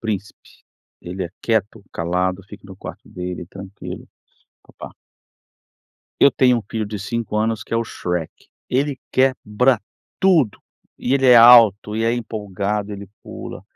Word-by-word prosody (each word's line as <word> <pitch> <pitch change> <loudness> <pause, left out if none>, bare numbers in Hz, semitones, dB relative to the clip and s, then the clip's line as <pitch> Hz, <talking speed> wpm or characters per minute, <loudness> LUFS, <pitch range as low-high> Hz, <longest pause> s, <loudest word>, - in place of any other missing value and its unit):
príncipe. 105 -3 -4 0.6
Ele 90 +2 -5
é 85 - -7
quieto, 110 -1 -1
calado, 90 +3 -1
fica 105 0 -12
no 95 -1 -11
quarto - - -10
dele 90 -1 -6
tranquilo. 95 +1 -9 0.6
Pa - - -21 0.2
pa - - -22 1.3
Eu 140 - +7
tenho 125 -3 +3
um 115 - -6
filho 110 -2 -2
de 105 0 -5
5 115 +1 -3
anos 110 -1 0
que - - -5
é - - +3
o 115 - 0
Shrek. 90 -6 -3 0.4
Ele 135 +1 0
quebra 130 -2 +2 0.4
tudo, 160 - +3 0.4
e 125 - -2
ele 135 -1 +2
é 125 - +8
alto, 115 -3 +7
e 115 - 0
é 115 - +2
empolgado, 105 -3 -3
ele 100 -1 -8
pula, - - -9
105 Hz, 155 wpm, -20 LUFS, 95-120 Hz, 1.3 s, é